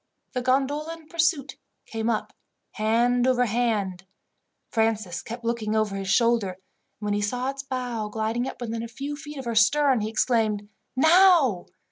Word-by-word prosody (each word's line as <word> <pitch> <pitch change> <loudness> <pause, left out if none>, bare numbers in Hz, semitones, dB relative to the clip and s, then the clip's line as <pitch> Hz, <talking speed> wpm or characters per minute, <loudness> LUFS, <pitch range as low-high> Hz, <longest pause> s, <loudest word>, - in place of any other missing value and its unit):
The 250 - -1
gondola 275 +5 0
in 325 - -18
pursuit 325 -5 0 0.3
came 225 0 -3
up 220 -2 -2 0.4
hand 240 +3 +2
over 250 -1 +3
hand. 210 -5 -1 0.7
Francis 220 -6 0
kept 235 +1 -8
looking 225 -2 -1
over 215 -2 +1
his 195 -1 -4
shoulder, 230 -2 +3
and - - -19 0.4
when 210 -1 -2
he 205 - 0
saw 250 +6 -1
its 275 0 -7
bow 250 -5 -3
gliding 225 +3 -1
up - - -7
within 230 -1 -3
a 230 - -5
few 275 +5 -5
feet 295 0 -9
of 265 - -6
her 235 - -2
stern 255 +3 +4
he 215 - -2
exclaimed 220 -3 +1 0.3
"Now!" 315 - +5
235 Hz, 165 wpm, -25 LUFS, 215-265 Hz, 0.7 s, Now